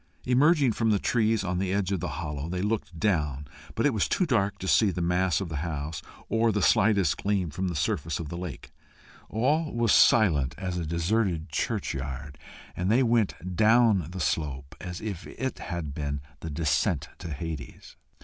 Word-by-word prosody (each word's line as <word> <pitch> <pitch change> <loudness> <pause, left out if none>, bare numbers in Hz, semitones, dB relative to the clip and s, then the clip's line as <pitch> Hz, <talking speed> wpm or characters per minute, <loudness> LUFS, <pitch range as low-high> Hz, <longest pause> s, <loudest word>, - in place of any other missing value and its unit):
Emerging 140 +1 +4
from 115 +1 0
the 105 - +4
trees 110 0 +1
on 90 -1 -1
the 95 -1 -1
edge 100 -1 0
of 95 - 0
the - - -3
hollow, 75 -1 -4
they 90 +1 -2
looked 105 -5 -2
down, 75 -7 0 0.3
but - - +1
it 145 - +3
was 105 - +1
too 185 - +1
dark 100 - +1
to 95 - -6
see 105 +2 +4
the 90 - -3
mass 90 +1 +1
of 95 - -3
the 80 -3 -4
house, 75 0 -4 0.3
or 115 0 +2
the 105 - 0
slightest 100 +2 +3
gleam 100 -5 0
from 95 +6 -2
the 85 - -3
surface 75 +2 -1
of 85 - -5
the 85 - -6
lake. 85 -5 -7 0.6
All 150 +8 +1
was 115 -2 +1
silent 75 - +4
as 95 -1 -3
a 85 -3 -3
deserted 85 0 0
churchyard, 70 0 -3 0.4
and 90 +3 0
they 125 +4 +4
went 110 -6 0
down 110 -4 +4
the 95 +1 -7
slope 70 -3 -2
as 90 -1 -6
if 105 -3 -5
it 130 0 -4
had 85 -5 -4
been 70 -1 -3 0.2
the 80 - -6
descent 75 0 0
to 85 - -6
Hades. 75 +1 -7
90 Hz, 190 wpm, -27 LUFS, 80-110 Hz, 0.6 s, Emerging